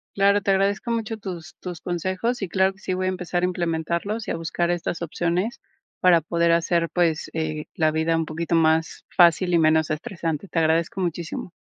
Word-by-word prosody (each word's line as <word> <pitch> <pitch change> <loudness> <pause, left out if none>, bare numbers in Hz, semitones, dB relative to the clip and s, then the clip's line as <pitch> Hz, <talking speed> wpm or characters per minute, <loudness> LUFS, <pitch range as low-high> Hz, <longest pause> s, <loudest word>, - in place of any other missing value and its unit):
Claro, 200 +1 +4
te 195 - +1
agradezco 200 +4 +1
mucho 225 -1 -2
tus 175 -5 -8
tus 175 -3 -7
consejos, 185 +7 -2
y 195 - -1
claro 190 +1 +2
que 190 - -23
sí 190 - -3
voy 185 0 -1
a - - +2
empezar 180 -1 -2
a - - +3
implementarlos 170 +5 -2
y - - -1
a - - -1
buscar 170 +1 -1
estas 175 -1 -2
opciones, 175 - -1 0.4
para 175 -3 +6
poder 170 +1 +1
hacer, 170 0 +2
pues, 165 -3 +1
eh, 155 -1 -3
la 155 -2 +2
vida 160 +1 +1
un 165 0 0
poquito 165 +2 -3
más 160 0 +2
fácil 175 0 +5
y - - +6
menos 160 -1 +3
estresante, 165 +1 -3
te 165 - -1
agradezco 165 +3 +1
muchísimo. 170 0 -4
170 Hz, 195 wpm, -24 LUFS, 165-190 Hz, 0.4 s, para